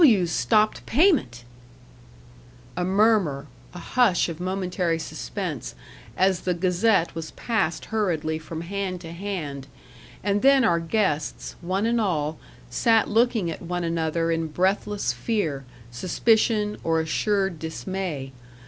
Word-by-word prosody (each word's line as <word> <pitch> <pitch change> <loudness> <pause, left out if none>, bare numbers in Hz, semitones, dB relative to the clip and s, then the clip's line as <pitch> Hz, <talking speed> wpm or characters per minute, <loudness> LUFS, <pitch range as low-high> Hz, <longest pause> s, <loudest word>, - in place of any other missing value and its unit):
"W 220 - +6
's 170 - -4
stopped 210 - +2
payment!" 255 - +2 1.3
A 180 - -1
murmur 190 -7 +2 0.3
a - - -6
hush 195 -1 +2
of 165 -1 -6
momentary 180 -2 -1
suspense, - - -5 0.4
as 190 -1 +3
the 180 -1 0
Gazette 185 +1 +2
was 160 -1 -5
passed 200 -8 -1
hurriedly 160 -7 0
from 160 +1 -7
hand 185 +1 -3
to 165 - -8
hand; 165 -7 -5 0.6
and 205 +1 +1
then 275 -1 +5
our 170 -6 +3
guests, 165 -4 -1
one 190 +4 -1
and 235 0 +2
all, 155 -6 -1 0.3
sat 225 -2 +2
looking 225 -5 +2
at - - -7
one 175 0 -3
another 165 0 0
in 165 0 0
breathless 195 +5 0
fear, 160 - -2 0.3
suspicion, 210 - +1
or 165 0 +2
assured 190 +2 0
dismay. 160 -3 -4
180 Hz, 130 wpm, -25 LUFS, 160-210 Hz, 1.3 s, W